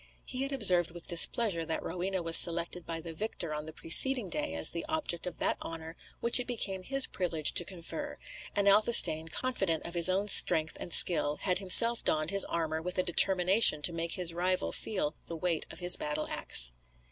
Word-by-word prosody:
He 255 0 -8
had 275 +1 -5
observed 185 -10 +1
with 170 0 -12
displeasure 170 +1 +2
that 160 0 -6
Rowena 185 +1 -7
was 165 0 +2
selected 170 +1 +3
by 165 -1 -7
the 165 0 -10
victor 170 -4 -7
on 150 +1 -9
the - - -10
preceding 215 +8 +2
day 80 - -5
as 80 - +1
the 170 - -8
object 300 - -4
of 175 - -9
that - - -3
honour 165 0 -10 0.3
which 235 +1 +6
it 250 - -7
became 200 -6 -5
his 270 +7 +4
privilege 165 -5 -2
to - - +1
confer, 170 -2 -10 0.4
and 200 0 -2
Athelstane, 200 -6 +4
confident 195 -4 -4
of 170 - -7
his 170 0 +3
own 195 +3 -3
strength 160 -5 +2
and 175 - -9
skill, 155 -5 +4
had 185 -2 -2
himself 230 +5 +4
donned 155 +2 -2
his 195 -1 +3
armour 160 -1 -6
with 180 +2 -8
a 185 - -1
determination 180 -2 +2
to 170 - 0
make 165 0 -5
his 175 -3 -1
rival 185 +2 -4
feel 185 -8 -6
the 165 - -8
weight 165 -1 -4
of - - -12
his 175 0 +6
battle 150 +1 -4
axe. - - +3
175 Hz, 200 wpm, -27 LUFS, 165-195 Hz, 0.4 s, which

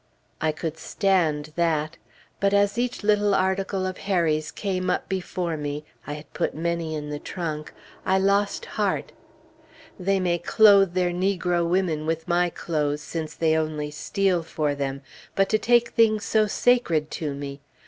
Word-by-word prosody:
I 160 - +2
could 160 0 -5
stand 160 -7 0
that. 165 -1 0 0.4
But 200 0 +2
as 200 +3 +2
each 245 -2 -2
little 205 -1 +3
article 190 0 0
of 185 0 -4
Harry's 160 -5 +1
came 185 -2 -2
up - - -1
before 180 -3 -2
me 145 0 -4 0.2
(I 145 - -3
had 150 -1 -10
put - - -1
many 165 0 -2
in 150 -1 -5
the 145 - -4
trunk), 155 -4 -5 0.3
I 190 - +2
lost 200 - +1
heart.... - - -1 0.9
They 195 +1 +1
may 175 -2 +1
clothe 195 -1 +5
their 180 -1 +2
negro 180 -2 0
women 170 -4 0
with 165 +1 -2
my 175 0 +2
clothes, 150 -3 -2
since 155 -1 -5
they 160 -1 +2
only 155 -2 -2
steal 175 +4 0
for 155 -2 -1
them; 140 -1 -3 0.3
but 195 0 +2
to 215 - +2
take 240 +1 +3
things 215 -3 +3
so 215 -1 +3
sacred 195 -10 +2
to 150 -3 -3
me! 140 0 -7
175 Hz, 160 wpm, -25 LUFS, 155-195 Hz, 0.9 s, clothe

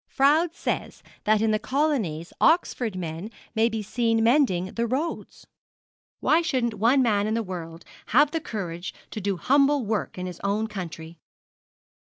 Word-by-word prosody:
Froude 315 +5 +3
says - - -3 0.2
that 215 0 +3
in 220 - +2
the 215 - +1
colonies 240 - -1
Oxford 255 - +2
men 170 +2 -5 0.2
may 225 +1 +3
be 220 -1 -3
seen 225 +1 +1
mending 225 -8 +2
the 235 0 -1
roads. 280 +8 -3 0.8
Why 320 +2 +4
shouldn't 255 -8 0
one 235 +6 +3
man 210 -3 +2
in 220 - 0
the 230 - 0
world 170 -3 -7 0.2
have 290 +5 +4
the 325 - -2
courage 180 - -5 0.2
to 215 - -5
do 195 -1 -1
humble 275 - +3
work 210 -2 -2
in 180 - -4
his 180 -2 -7
own 205 +2 0
country? 170 -6 -7
220 Hz, 160 wpm, -25 LUFS, 185-265 Hz, 0.8 s, Why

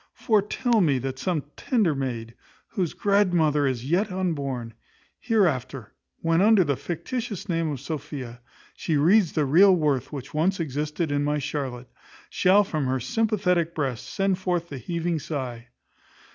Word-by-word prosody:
Foretel 220 +2 +1
me 145 -7 +3
that 130 +1 -4
some 170 -4 -1
tender 215 -11 +1
maid, 120 -4 -4 0.4
whose 185 -7 -2
grandmother 175 -8 +2
is 130 -1 -3
yet 185 +6 +1
unborn, 140 -11 -3 0.5
hereafter, 140 - 0 0.3
when, 165 +1 +2
under 210 -2 +5
the 140 -4 0
fictitious 205 - -5
name 165 -2 0
of 140 - -4
Sophia, 135 -4 -6 0.3
she 155 - -1
reads 175 +4 +4
the 150 - +1
real 185 +7 +6
worth 145 -6 0
which 140 -4 -7
once 180 +5 +1
existed 150 +1 -2
in 145 0 +1
my 150 +1 0
Charlotte, 135 -4 -4 0.4
shall 195 +3 +4
from 155 -8 -2
her 130 +1 0
sympathetic 180 - 0
breast 135 -6 -3
send 195 -1 0
forth 175 -2 -1
the 140 - -6
heaving 170 +5 -2
sigh. 125 -6 -5
155 Hz, 145 wpm, -25 LUFS, 135-185 Hz, 0.5 s, real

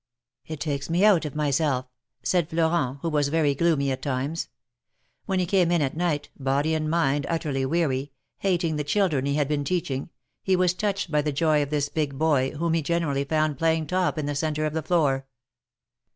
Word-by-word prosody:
^^It 155 - -4
takes 140 -1 -3
me 175 +5 +3
out 190 -7 +5
of 150 - -5
myself/' 145 -3 +1 0.4
said 175 -4 +1
Florent, 160 -5 +1
who 165 - 0
was 150 -2 +1
very 150 -1 +2
gloomy 140 -2 +1
at 130 - -3
times. 140 +4 -2 0.8
When 190 - 0
he 180 - +1
came 180 -1 +2
in 170 -3 +3
at 135 - -2
night, 160 -4 -1
body 140 +4 +1
and 155 -1 -1
mind 145 -4 +1
utterly 145 -5 -1
weary, 140 -3 0 0.3
hating 175 -5 0
the 150 - -1
children 150 -5 +1
he 140 - 0
had 145 -2 +1
been 145 -1 -1
teaching, 140 -4 -2 0.3
he 190 - +2
was 180 -1 +2
touched 195 -2 -2
by 150 -1 +3
the 150 +1 -1
joy 155 +1 +2
of 145 - -2
this 145 -1 0
big 145 -3 -2
boy, 145 -4 +2
whom 165 +2 -1
he 165 - +2
generally 150 -3 0
found 155 -1 0
playing 160 -1 +2
top 180 +2 0
in 155 - -2
the 145 - -2
centre 155 +1 -1
of 155 - -2
the 160 - -1
floor. 140 -5 +1
155 Hz, 200 wpm, -25 LUFS, 140-170 Hz, 0.8 s, out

